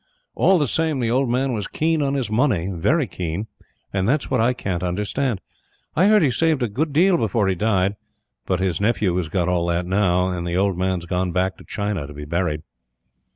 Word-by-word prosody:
All 190 - +4
the 150 - +2
same, 160 +2 0
the 115 -2 0
old 130 +1 +1
man 130 +2 0
was 105 -4 -3
keen 160 0 0
on 140 -1 0
his 125 -6 -2
money, 110 - +1
very 130 - +1
keen; 90 0 -4 0.5
and 95 +1 0
that's 140 +1 0
what 130 -3 +2
I 120 +2 +3
can't 95 -8 -3
understand. 105 +6 -1 0.5
I 180 +6 +4
heard 215 -3 +5
he 140 - +3
saved 155 0 +1
a - - +1
good 145 +9 -2
deal 175 +5 +4
before 110 -2 +1
he 95 - +2
died, 100 0 +1 0.5
but 95 -1 0
his 95 -2 -1
nephew 105 -4 +1
has 85 -4 -2
got 85 0 0
all 90 -1 +1
that 85 +1 0
now; 90 -1 +2
and 85 -1 -3
the 85 +1 -1
old 100 0 +2
man's 90 -1 -1
gone 90 +1 -1
back 95 +2 0
to - - -14
China 100 -8 -3
to 75 - -11
be 75 0 -7
buried. 85 -1 -1
100 Hz, 215 wpm, -22 LUFS, 90-130 Hz, 0.5 s, heard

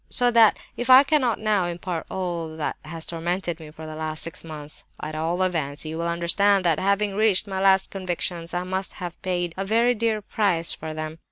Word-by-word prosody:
"So 245 -1 +3
that 230 -2 +6 0.2
if 245 - -4
I 260 +2 +10
cannot 275 -6 +2
now 210 -4 +1
impart 175 -1 -4
all 170 -4 -3
that 155 - -2
has 160 +1 -5
tormented 170 0 -2
me 155 -1 -10
for 160 +1 -10
the 155 0 -7
last 155 0 -3
six 165 +2 -6
months, 155 -2 -9 0.2
at 155 - -5
all 165 +4 0
events 155 -5 -2
you 155 +1 -4
will 170 - -1
understand 185 +3 +2
that, 165 -3 +3
having 200 +1 +1
reached 210 -1 +3
my 190 -2 -4
'last 190 0 +4
convictions,' 175 -2 -3
I 175 - 0
must 190 +1 -3
have 175 -3 -7
paid 175 -3 -1
a 195 - -1
very 230 +5 +3
dear 220 -2 0
price 185 -6 0
for 155 0 -6
them. 155 +1 -5
175 Hz, 205 wpm, -24 LUFS, 165-200 Hz, 0.2 s, I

